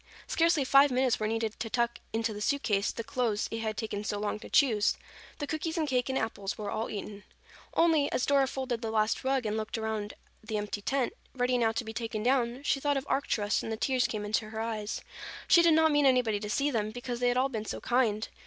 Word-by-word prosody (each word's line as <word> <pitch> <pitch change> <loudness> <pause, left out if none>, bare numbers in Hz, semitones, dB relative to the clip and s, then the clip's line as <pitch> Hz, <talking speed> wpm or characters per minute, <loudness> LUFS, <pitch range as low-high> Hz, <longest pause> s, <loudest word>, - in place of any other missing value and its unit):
Scarcely 330 -3 +2
five 275 +2 +6
minutes 255 -1 +1
were 215 - 0
needed 225 -1 -2
to 225 - -3
tuck 235 +1 0
into 225 0 -1
the 205 - -7
suit 280 +6 0
case 200 -2 +1
the 230 - -5
clothes 225 -3 -1
it 225 - -3
had 220 -1 -3
taken 215 -3 -3
so 210 -1 -2
long 210 0 -2
to - - -10
choose. 230 -9 +3 0.4
The 290 - -3
cookies 320 +3 -3
and 315 -2 0
cake 250 -2 0
and 265 - 0
apples 210 -4 -3
were 205 -1 -4
all 225 - -2
eaten. 205 0 -6 0.5
Only, 320 -4 +3
as 255 - 0
Dora 275 -1 +3
folded 255 -3 -3
the 225 - -3
last 215 0 +1
rug 265 -2 +1
and 210 0 -1
looked 220 +1 -3
around 220 -2 -3 0.3
the 215 0 -3
empty 205 0 -3
tent, 265 +3 0 0.2
ready 250 0 +1
now 230 -2 +2
to 230 +1 -3
be 220 - -6
taken 225 -2 -3
down, 250 +1 +1
she 280 - +1
thought 285 0 +1
of 270 - -3
Arcturus 210 -6 0
and 225 - -5
the 220 - -2
tears 255 +2 +1
came 210 -1 -4
to 215 0 0
her 220 0 -6
eyes. 220 -2 -3 0.5
She 340 - +7
did 335 -2 +5
not 320 0 +4
mean 290 -1 +4
anybody 245 -5 +3
to 210 0 -5
see 285 +6 +1
them, 215 -4 -1
because 245 +1 -5
they 245 - +2
had 245 0 +2
all 265 +2 +2
been 220 -4 -4
so - - -4
kind. 225 -4 +1
230 Hz, 240 wpm, -30 LUFS, 215-265 Hz, 0.5 s, She